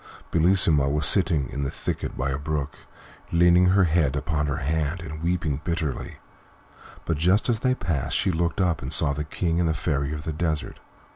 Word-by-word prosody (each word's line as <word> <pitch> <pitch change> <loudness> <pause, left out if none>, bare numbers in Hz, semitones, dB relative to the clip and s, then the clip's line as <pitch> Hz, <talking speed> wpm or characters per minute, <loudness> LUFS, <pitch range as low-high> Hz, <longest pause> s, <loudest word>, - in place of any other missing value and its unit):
Bellissima 80 -5 +3
was 75 +2 0
sitting 85 -9 +5
in 70 - -6
a - - -1
little - - -2
thicket - - -4
by 70 +2 -1
a 65 - -3
brook, 75 -1 -3 0.6
leaning 85 +1 +4
her 95 +1 +4
head 80 -5 +1
upon 75 0 -1
her 70 - -2
hand 80 +4 -2
and 80 -1 -8
weeping 85 -4 -1
bitterly, 85 -6 -4 0.9
but 80 - -1
just 90 +7 +2
as 115 -2 +1
they 130 +1 +1
passed 85 - -2
she 95 - +1
looked 85 +1 -2
up 90 -4 0
and 65 - -6
saw 70 - +3
the 75 +2 -3
King 85 +2 -2
and 85 -2 +1
the 80 - -1
Fairy 70 -1 -2
of 75 0 -5
the 80 - -4
Desert. 80 -1 -3
80 Hz, 200 wpm, -24 LUFS, 75-85 Hz, 0.9 s, sitting